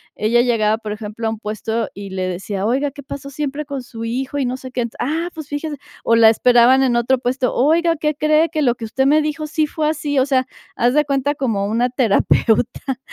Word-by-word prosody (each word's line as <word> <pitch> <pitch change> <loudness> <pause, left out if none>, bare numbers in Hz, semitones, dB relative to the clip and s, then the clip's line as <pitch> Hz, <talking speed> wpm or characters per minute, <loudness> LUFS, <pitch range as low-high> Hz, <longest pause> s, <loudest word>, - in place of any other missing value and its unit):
ella 230 +3 +2
llegaba, 220 -3 +2
por 215 -2 -5
ejemplo, 215 +1 -5
a - - +1
un 220 - -4
puesto 220 +1 -3
y 200 -1 -8
le 185 -1 -2
decía: 195 +2 -4
"Oiga, 270 +5 0
¿qué 285 +1 -11
pasó 275 +1 -7
siempre 290 +1 -4
con 280 -3 -5
su 230 -2 -8
hijo?". 260 +4 -3
Y 275 - 0
no 250 +1 -2
sé 260 -1 -10
qué. 245 -1 -1
"Ah, 325 +6 -1
pues, 315 -3 -7
fíjese", 295 +1 -4 0.3
o 230 - +4
la 225 -1 +7
esperaban 245 +3 +5
en 255 -3 +2
otro 240 +2 +2
puesto: 250 0 -1
"Oiga, 330 +5 +2
¿qué 300 0 -1
cree? 305 +2 +3
Que 310 -1 -2
lo 245 -3 +2
que 230 - -7
usted 265 +4 0
me 300 +2 +4
dijo 305 0 -3
sí 310 0 0
fue 305 0 -1
así". 295 -2 -2
O 260 - +3
sea, 260 -2 +1 0.3
haz 245 +2 +2
de 300 - +4
cuenta, 280 +1 0
como 225 -8 -1
una 235 +4 +1
terapeuta. 245 +2 +1
255 Hz, 230 wpm, -19 LUFS, 230-290 Hz, 0.3 s, la